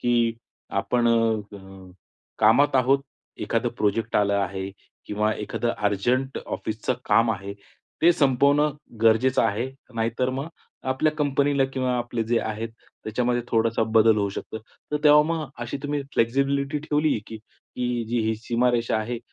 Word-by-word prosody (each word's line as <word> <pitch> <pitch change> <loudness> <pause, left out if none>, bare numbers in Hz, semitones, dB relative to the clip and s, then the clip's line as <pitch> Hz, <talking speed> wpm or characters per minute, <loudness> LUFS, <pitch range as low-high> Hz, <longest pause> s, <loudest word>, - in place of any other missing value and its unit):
की 120 -1 +2 0.5
आपण 120 -1 +1
अ, 100 -5 -2 0.5
कामात 125 +6 +4
आहोत, 130 +2 +4 0.4
एखादं - - 0
प्रोजेक्ट 110 +2 0
आला 100 -1 +2
आहे 95 +1 -5 0.4
किंवा 105 +1 0
एखादं 115 +3 -2
अर्जंट 120 +7 0
ऑफिसचं 110 +3 -3
काम 115 0 +3
आहे, 100 -1 -4 0.5
ते 175 +2 +7
संपवणं 140 +1 +3 0.3
गरजेचं 115 +3 +4
आहे, 115 +4 0 0.2
नाहीतर 115 +3 0
मग 135 +3 -4 0.5
आपल्या 155 +4 +1
कंपनीला 140 -1 +2
किंवा 130 -1 -1
आपले 120 -1 -2
जे 115 +1 +1
आहेत 110 +1 -4 0.4
त्याच्यामध्ये 120 +2 0
थोडासा 115 0 +1
बदल 110 0 +5
होऊ 100 -1 +1
शकतो. 110 - -6
तर 115 +6 -7
तेव्हा 150 0 +8
मग 160 - -3 0.2
अशी 120 +3 -4
तुम्ही 145 0 -2
फ्लेक्सिबिलिटी 140 +4 +1
ठेवली 150 -3 0
की 110 - -7
की 120 +2 -5
जी 120 +1 0
ही 110 - +1
सीमारेषा 120 +1 0
आहे 115 +2 -3
120 Hz, 140 wpm, -24 LUFS, 110-135 Hz, 0.5 s, तेव्हा